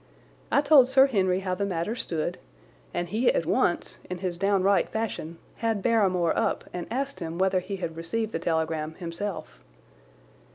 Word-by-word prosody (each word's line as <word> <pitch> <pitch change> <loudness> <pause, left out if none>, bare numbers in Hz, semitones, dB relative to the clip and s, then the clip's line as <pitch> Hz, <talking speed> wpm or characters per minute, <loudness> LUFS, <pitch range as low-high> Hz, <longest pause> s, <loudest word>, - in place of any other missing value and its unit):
I 280 - +5
told 285 -3 +6
Sir 265 +1 +6
Henry 190 -7 +1
how 185 -1 -2
the 185 - -2
matter 190 +2 -2
stood, 165 -9 -3 0.5
and 175 - -2
he 230 +6 +3
at 165 - 0
once, 175 +1 0
in 180 - -3
his 180 -1 -3
downright 195 0 +2
fashion, 205 -7 -4 0.2
had 225 -4 -1
Barrymore 185 -7 +2
up - - 0
and 175 -1 -4
asked 275 +4 -3
him 165 -1 -5
whether 190 0 +2
he 185 +2 -5
had 170 -4 -4
received 215 +7 -2
the 165 - -2
telegram 160 -2 -1
himself. 170 - -6
185 Hz, 165 wpm, -27 LUFS, 170-220 Hz, 0.5 s, told